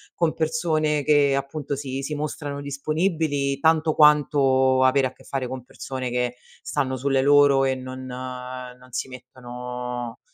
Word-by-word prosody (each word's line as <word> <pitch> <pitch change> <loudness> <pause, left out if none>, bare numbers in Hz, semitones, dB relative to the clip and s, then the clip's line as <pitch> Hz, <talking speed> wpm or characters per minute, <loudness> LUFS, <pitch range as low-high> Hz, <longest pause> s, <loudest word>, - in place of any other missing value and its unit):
con 170 -2 +1
persone 155 -2 0
che 145 -1 +4
appunto 140 +1 -3
si 135 -1 -4
si 150 +2 -4
mostrano 145 -1 -4
disponibili 145 -1 -1
tanto 160 0 +3
quanto 135 -3 +4
avere 130 0 +4
a 125 - -11
che - - -20
fare 135 -2 -3
con 130 -1 -6
persone 130 0 -6
che 125 0 -1 0.3
stanno 130 0 -1
sulle 135 0 +1
loro 145 -1 +5
e 130 0 +1
non 130 0 -7
non 125 0 -7
si 130 - -3
mettono 125 -1 -7
135 Hz, 145 wpm, -24 LUFS, 130-145 Hz, 0.3 s, loro